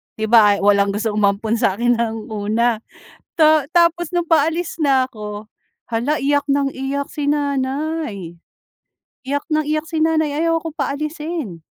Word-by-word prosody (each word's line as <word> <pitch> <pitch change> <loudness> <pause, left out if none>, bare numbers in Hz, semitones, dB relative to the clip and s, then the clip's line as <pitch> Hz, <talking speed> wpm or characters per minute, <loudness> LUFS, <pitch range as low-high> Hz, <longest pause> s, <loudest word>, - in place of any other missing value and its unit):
'Di 220 +1 -3
ba, 210 -3 +6
ay - - -5
walang 200 0 +3
gustong 215 -1 -1
umampon 210 +3 +1
sa 190 - +2
akin 240 +2 +1
ng 225 -1 -3
una, 220 +2 0 0.6
ta 310 -3 +4
tapos 340 -1 +2
no'ng 345 - +1
paalis 325 +1 +1
na 270 -3 +3
ako, 210 -3 -8 0.5
hala 245 +7 0
iyak 285 +1 0
ng 275 -1 +1
iyak 275 +1 -3
si 295 - -4
nanay, 280 - -2 0.9
iyak 285 +2 -1
ng 310 0 +2
iyak 310 +1 -1
si 320 - -2
nanay 315 -2 +1
ayaw 330 0 +2
ako 325 - -4
paalisin. 300 - -4
275 Hz, 155 wpm, -19 LUFS, 220-310 Hz, 0.9 s, ba